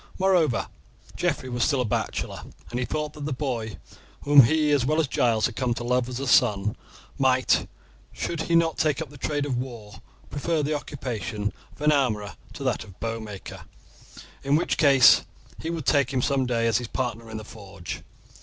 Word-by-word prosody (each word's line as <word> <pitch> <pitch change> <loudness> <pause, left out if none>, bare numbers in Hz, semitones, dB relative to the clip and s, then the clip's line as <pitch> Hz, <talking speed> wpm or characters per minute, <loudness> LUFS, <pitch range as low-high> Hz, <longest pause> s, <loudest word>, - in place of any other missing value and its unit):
Moreover, 180 -10 +2 0.5
Geoffrey 130 - -1
was 120 -1 0
still 140 -3 +2
a - - 0
bachelor, 105 - -2 0.3
and 120 - -2
he 125 - -2
thought 150 -1 -3
that 150 -2 -7
the 150 - -3
boy, 125 -6 -3 0.4
whom 145 -3 +8
he 155 +3 +2
as 145 -4 +3
well 155 +5 +1
as 160 - +2
Giles 115 -4 +2
had 120 - -2
come 125 -3 0
to 120 - -5
love 125 0 +1
as 125 0 -4
a 140 - -3
son, 105 -5 +3 0.4
might, 130 -1 +3 0.4
should 170 -2 -3
he 170 +1 0
not 165 -1 +2
take 150 -3 +2
up 160 -4 -5
the 145 - -12
trade 145 +1 -1
of 130 -4 -1
war, 115 -5 -8 0.3
prefer 155 +2 -1
the 150 +2 0
occupation 115 -8 -4 0.2
of - - -18
an 150 - +5
armourer 110 -8 0 0.2
to - - -7
that 130 -4 0
of 110 - -14
a - - -13
bowmaker, 110 -1 -6 0.8
in 140 +1 +2
which 165 - +1
case 140 -4 +7 0.4
he 160 - -4
would 165 -4 -4
take 140 -3 +3
him 130 -2 0
some 135 -2 +1
day 115 -2 0
as 115 0 +3
his 120 - -5
partner 115 -2 -3
in 110 - -6
the 110 - -7
forge. 100 -5 -8
130 Hz, 200 wpm, -25 LUFS, 115-145 Hz, 0.8 s, whom